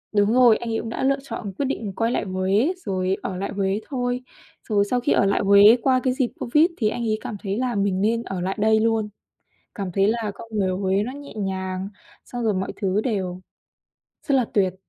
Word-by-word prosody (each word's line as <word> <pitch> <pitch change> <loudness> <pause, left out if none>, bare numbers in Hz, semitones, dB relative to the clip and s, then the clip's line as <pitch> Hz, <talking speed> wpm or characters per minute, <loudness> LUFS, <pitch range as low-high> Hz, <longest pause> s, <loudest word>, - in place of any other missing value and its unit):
đúng 205 +2 +3
rồi, 245 -3 +6
anh 235 - -6
ấy 225 - 0
cũng 225 - -5
đã 235 - -3
lựa 275 +1 +2
chọn 220 -6 -6
quyết 280 - 0
định 220 -7 -3
quay 230 +1 0
lại - - 0
Huế 195 - +1
rồi 185 0 0
ở 185 - -3
lại 200 +2 -3
Huế 195 +1 0
thôi. 250 -1 -2 0.5
Rồi 205 -2 +3
sau 245 +4 0
khi 250 - 0
ở - - +4
lại 195 - +2
Huế 200 +3 +7
qua 260 -1 +3
cái 255 - +1
dịp 255 -2 -1
Covid 300 +7 +4
thì 215 -3 +1
anh 235 +2 -4
ấy 215 -1 0
cảm 210 - -5
thấy 200 +1 -2
là 250 -2 -1
mình 195 -1 0
nên 230 +2 +1
ở 190 -5 -4
lại 190 +2 -2
đây 220 +1 +4
luôn, 220 -1 +1 0.7
cảm 195 -4 -4
thấy 195 +2 +3
là 225 -1 -1
con 230 - -11
người 200 -3 +1
ở 185 - -2
Huế 195 +1 +1
nó 245 +5 -4
nhẹ 285 -2 -10
nhàng, 190 -1 -3 0.4
xong 245 -1 -5
rồi 215 -3 +2
mọi 190 +1 -2
thứ 195 +1 0
đều 185 -6 -2 0.9
rất 280 - +3
là 255 - +4
tuyệt, 190 -3 +2
210 Hz, 235 wpm, -23 LUFS, 195-240 Hz, 0.9 s, Huế